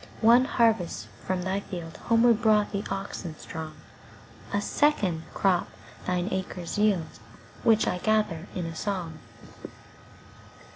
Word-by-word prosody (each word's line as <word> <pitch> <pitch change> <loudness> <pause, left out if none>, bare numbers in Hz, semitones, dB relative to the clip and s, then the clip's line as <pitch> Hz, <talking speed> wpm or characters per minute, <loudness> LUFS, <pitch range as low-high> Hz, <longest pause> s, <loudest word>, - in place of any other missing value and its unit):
One 235 +3 +6
harvest 225 -9 +1 0.2
from 185 -1 0
thy 190 +2 0
fieldHomeward 225 +7 +1
brought 215 -2 +3
the 200 0 -2
oxen 190 -4 -5
strong;A 160 +5 -8
second 205 - +1
crop 185 -3 +2 0.4
thine 180 0 0
acres 185 0 -3
yield, 195 -7 +1 0.4
Which 220 -2 +4
I 180 - 0
gather 210 -5 +1
in 180 - -2
a 165 -1 -5
song. 175 -5 -3
190 Hz, 110 wpm, -27 LUFS, 175-215 Hz, 0.4 s, One